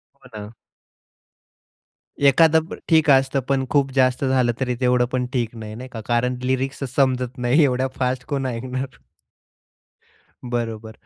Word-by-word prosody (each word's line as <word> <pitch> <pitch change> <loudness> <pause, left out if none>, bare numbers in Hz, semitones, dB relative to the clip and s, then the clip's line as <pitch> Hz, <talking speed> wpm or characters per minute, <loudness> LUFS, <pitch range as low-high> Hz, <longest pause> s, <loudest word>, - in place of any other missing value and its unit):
हो 135 -1 -19
ना. 105 +1 -8 1.7
एखादं 160 +3 +5 0.3
ठीक 160 -2 +4
असतं, 135 0 +4
पण 135 -1 +1
खूप 140 -2 +1
जास्त 130 0 +2
झालं 130 -2 +2
तरी 125 -2 -1
तेवढं 125 0 +3
पण 125 -1 -1
ठीक 120 -3 -2
नाही 110 -1 -8
नाही 130 +2 -9
का. 115 -3 -7
कारण 125 +1 +1
लिरिक्स 130 +2 -2
समजत 130 -2 +1
नाही, 125 +5 +3
एवढ्या 130 -1 +1
फास्ट 125 0 -1
कोण 140 -2 -2
ऐकणार? 130 +1 -4 1.5
बरोबर 115 -2 -3
130 Hz, 135 wpm, -22 LUFS, 125-135 Hz, 1.7 s, एखादं